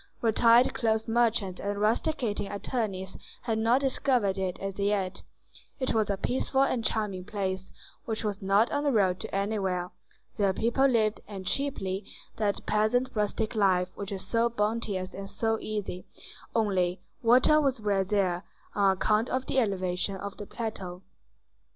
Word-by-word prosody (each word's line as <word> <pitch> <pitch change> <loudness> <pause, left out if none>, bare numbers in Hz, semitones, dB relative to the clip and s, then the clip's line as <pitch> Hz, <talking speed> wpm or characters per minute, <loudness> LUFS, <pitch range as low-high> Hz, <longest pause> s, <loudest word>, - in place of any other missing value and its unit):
Retired 230 +2 +5
cloth 220 -2 0
merchants 225 -5 +1
and 200 0 -2
rusticating 220 -1 0
attorneys 200 -3 -3 0.3
had 225 -2 0
not 235 +4 +3
discovered 255 -7 +1
it 190 -2 -2
as 195 0 -5
yet; 200 -2 0 0.6
it 260 - 0
was 220 -2 +1
a 200 - 0
peaceful 265 +5 +1
and 250 -4 0
charming 210 -5 -1
place, 190 -2 -3 0.3
which 220 -3 -3
was 205 -2 -2
not 200 +4 +3
on 290 0 0
the 290 - +2
road 190 -6 +2
to - - -5
anywhere: 195 -3 -1 0.5
there 200 -2 +2
people 240 +7 +2
lived, 220 -4 +1
and 195 -3 -7
cheaply, 200 -6 -1 0.3
that 205 -2 -1
peasant 220 +5 +2
rustic 215 +1 -1
life 185 -4 +2
which 200 -1 -6
is 190 -2 -5
so 230 +3 +2
bounteous 210 -4 -1
and 195 0 -7
so 225 -1 0
easy; 205 -4 -4 0.5
only, 190 -5 +1 0.2
water 255 +6 +5
was 270 -4 +1
rare 200 -2 +1
there, 185 -2 0 0.3
on 195 -2 +4
account 215 +4 +2
of 260 0 -1
the 265 - +1
elevation 195 -3 -1
of 200 +1 -6
the 205 - -7
plateau. 190 -5 -5
210 Hz, 155 wpm, -28 LUFS, 195-230 Hz, 0.6 s, Retired